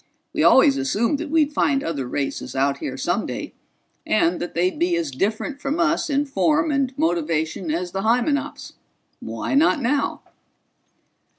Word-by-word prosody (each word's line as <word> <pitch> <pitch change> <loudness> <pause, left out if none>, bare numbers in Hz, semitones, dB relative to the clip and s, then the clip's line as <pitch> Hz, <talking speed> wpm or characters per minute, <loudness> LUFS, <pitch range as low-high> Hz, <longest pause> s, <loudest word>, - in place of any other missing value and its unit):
We - - 0
always 275 -3 +6
assumed 270 0 0
that 325 -1 -5
we'd 305 -1 +2
find 275 -2 +1
other 140 -6 -3
races 140 +1 -4
out 140 +1 +1
here - - -5
someday, - - -2 0.5
and 165 +11 +1
that 175 - -5
they'd 180 - 0
be 345 +1 +2
as 335 -3 -2
different 220 +8 -2
from 290 +5 -2
us 335 -1 +1
in 285 0 +1
form 305 +2 +1
and 275 -3 +1
motivation 165 0 -1
as 175 +3 -2
the 195 - -3
Hymenops. 250 +7 0 0.5
Why - - -4
not 300 +2 +4
now?" 280 +3 -1
270 Hz, 155 wpm, -22 LUFS, -, 0.5 s, always